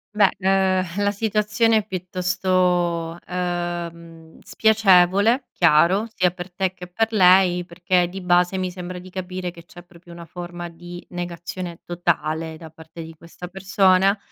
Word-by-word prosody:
Beh, 205 -2 +4
ehm, 190 0 +1
la 205 - +2
situazione 215 +2 +1
è 215 - -1
piuttosto, 180 -2 -1
ehm, 170 -2 -5
spiacevole 210 +3 +3
chiaro, 175 +6 +3
sia 180 -2 +2
per 175 0 -9
te 190 +1 -2
che 180 -1 -10
per 225 +5 -1
lei, 180 -2 +5
perché 175 0 0
di 190 +2 -7
base 180 +1 +2
mi 185 -1 -2
sembra 180 0 -7
di 180 +1 -11
capire, 185 -1 -5
che 170 -1 -15
c'è 175 0 -14
proprio 175 0 -18
una 170 0 -10
forma 175 0 -7
di 175 +1 -11
negazione 175 0 -6
totale 160 -2 -2
da 160 -1 -12
parte 160 +1 -11
di 165 0 -10
questa 170 +2 -11
persona. 195 +1 +2
180 Hz, 145 wpm, -22 LUFS, 175-190 Hz, -, lei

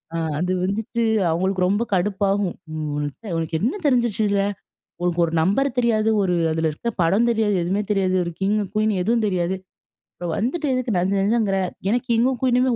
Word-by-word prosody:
அ - - 0 0.2
அது 180 +3 0
வந்துட்டு 220 +4 -1 0.3
அவுங்களுக்கு 185 +3 0
ரொம்ப 205 +5 +1
கடுப்பாகும். 195 0 0 0.8
உனக்கு 165 0 -1
என்ன 235 - 0
தெரிஞ்சிருச்சு 240 -6 +2
இதுல? 200 -1 +2 0.6
உனக்கு 175 -1 0
ஒரு 165 - -2
நம்பர் 205 +12 +2
தெரியாது, 220 -3 +2
ஒரு 180 -2 +1 0.2
அதுல 160 0 0
இருக்கிற 235 +10 -4
படம் 195 +8 +3
தெரியாது, 220 -3 +1
எதுவுமே 195 +4 0
தெரியாது 190 -2 +1
.ஒரு 170 - -3
கிங், 205 +2 +1 0.2
குயின் 215 0 +2
எதுவும் 230 +3 +1
தெரியாது. 185 -1 0 0.6
இப்போ 175 - -6
வந்துட்டு 295 +8 -1
எதுக்கு 255 -4 -1
நச 180 +1 +1
நசங்கிற? 205 -1 +1 0.3
ஏன்னா 225 +5 +3
கிங்கும் 245 +2 +2
குயீனுமே 255 0 +3
205 Hz, 160 wpm, -22 LUFS, 185-235 Hz, 0.8 s, படம்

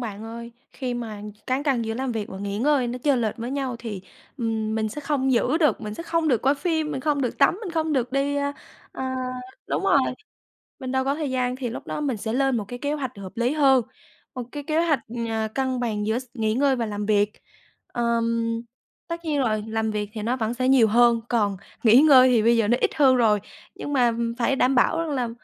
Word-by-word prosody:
bạn 220 -2 -6
ơi. 235 +1 -8 0.2
Khi 250 -3 -4
mà 220 -4 -6 0.2
cán 260 +2 0
cân 265 -6 +1
giữa 225 0 -3
làm 260 0 -2
việc 215 -2 -3
và 190 - -8
nghỉ 200 0 -3
ngơi 275 +1 +2
nó 245 +1 -4
chênh 265 -2 +2
lệch 220 -2 -1
với 235 +2 -5
nhau 270 -3 -2
thì, 210 -6 -6 0.4
ừm, 220 -2 -1
mình 220 -1 0
sẽ 295 - -6
không 275 -2 0
giữ 255 +6 +2
được, 305 -3 +2
mình 210 0 -5
sẽ 335 - -6
không 330 -2 0
được 245 -5 +2
coi 275 +2 +3
phim, 315 0 -1
mình 265 - -3
không 290 0 0
được 245 - -2
tắm, 280 +6 +4
mình 370 - -4
không 320 -1 -1
được 250 -2 0
đi, 280 +1 0
ơ, 285 0 -1 0.4
ờ - - -6 0.6
đúng - - -2
rồi, - - +5 0.8
mình 260 -2 -5
đâu 260 0 +1
có 275 +1 0
thời 300 -2 -3
gian. 250 -1 0
Thì 255 -3 -4
lúc 235 - -7
đó - - -3
mình 270 -7 -1
sẽ 220 +2 -3
lên 270 -1 +2
một 210 - -3
cái 245 +2 -7
kế 285 +3 -1
hoạch 275 -5 -3
hợp 190 -2 -8
lý 240 +2 +1
hơn, 270 -4 +5 0.5
một 250 - -3
cái 290 -1 -6
kế 320 +3 +1
hoạch, 300 -4 +3 0.3
ờ, 220 -1 -1
cân 260 -1 0
bằng 215 -4 -1
giữa 225 +3 +1
x 260 - -11
nghỉ 220 -4 0
ngơi 270 +2 +2
và 235 -2 -1
làm 205 -1 -4
việc. 205 -1 +2 0.6
Ờm, 230 -1 0 0.5
tất 335 0 -5
nhiên 300 -3 0
rồi, 215 -5 0
làm 220 0 -1
việc 210 -1 -3
thì 215 - -5
nó 235 +4 0
vẫn 225 0 -1
sẽ 255 +1 -1
nhiều 260 -4 +6
hơn, 235 +1 +4
còn 205 -5 +1 0.3
nghỉ 235 +3 +7
ngơi 265 -4 +7
thì 235 -3 +4
bây 235 +1 +4
giờ 225 -2 +2
nó 240 +3 +3
ít - - +2
hơn 270 -4 +5
rồi, 220 -4 +3 0.4
nhưng 290 - -5
mà, 250 -3 +4
ừm, 235 0 -1
phải 250 +3 +1
đảm 260 0 +2
bảo 250 +6 +3
rằng 330 -1 -2
là, 250 -4 -1
245 Hz, 245 wpm, -24 LUFS, 225-275 Hz, 0.8 s, nghỉ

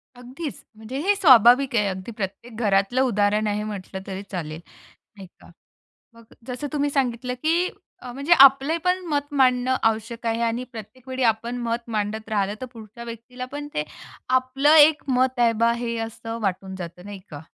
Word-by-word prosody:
अगदीच. 255 +5 -8
म्हणजे 220 +4 -7
हे 410 - +4
स्वाभाविक 260 - +6
आहे. 210 -2 +2
अगदी 190 +3 -5
प्रत्येक 210 +3 -6
घरातलं 200 +5 +2
उदाहरण 210 -3 +1
आहे 210 0 -1
म्हटलं 195 -2 -6
तरी 195 0 -5
चालेल. 160 -3 -5 0.6
नाही 195 -1 -10
का. - - -17 0.7
मग 230 0 -17 0.2
जसं 250 +3 -5
तुम्ही 290 -1 0
सांगितलं 250 -3 -1
की 335 +3 +2 0.4
अ, 250 - -6
म्हणजे 280 +6 -2
आपलेपण 320 +7 +3
मत 290 -2 -1
मांडणं 255 -1 +3
आवश्यक 225 +2 -5
आहे 230 0 0
आणि 230 +1 -1
प्रत्येक 240 +3 -11
वेळी 260 0 -3
आपण 230 +2 0
मत 230 0 0 0.2
मांडत 215 +1 -3
राहिलं 205 -2 0
तर 255 - -5
पुढच्या 230 0 -11
व्यक्तीला 235 +2 -8
पण 290 0 -6
ते 150 - -1 0.5
आपलं 270 +4 +2
एक 305 0 +6
मत 255 0 +1
आहे 235 -1 +4
बा 230 - +5
हे 235 0 -3
असं 225 0 -7
वाटून 190 -1 -2
जातं, 180 -1 -8
नाही 205 0 -8
का? 145 -2 -8
235 Hz, 170 wpm, -23 LUFS, 210-260 Hz, 0.7 s, स्वाभाविक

